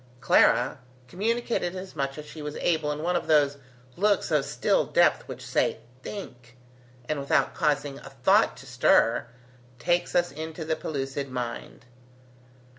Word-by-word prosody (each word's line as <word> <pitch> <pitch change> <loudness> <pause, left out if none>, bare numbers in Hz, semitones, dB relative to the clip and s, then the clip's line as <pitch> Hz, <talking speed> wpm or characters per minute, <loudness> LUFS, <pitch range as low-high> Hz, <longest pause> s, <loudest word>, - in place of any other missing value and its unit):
Clara, 130 0 +3 0.3
communicated 215 - -1
as 185 -1 -8
much 135 -2 -2
as 150 - -7
she 155 +1 -10
was 150 0 -5
able 155 -3 0
in 150 +1 -4
one 180 +1 0
of - - -1
those 145 -2 +3 0.4
looks 205 -2 +1
of 150 -3 +2
still 145 - +1
depth - - +2
which - - -8
say, - - +1 0.2
Think! 125 - -9 0.5
and 155 -2 -1
without 140 - +1
causing 145 -2 0
a 135 - -11
thought 190 +10 +3
to 130 - -12
stir, 125 -2 +3 0.5
takes 175 +6 0
us 175 0 +2
into 160 +2 -6
the 160 0 0
pellucid 140 -2 -4
mind. 120 -1 -6
150 Hz, 150 wpm, -27 LUFS, 135-175 Hz, 0.5 s, Clara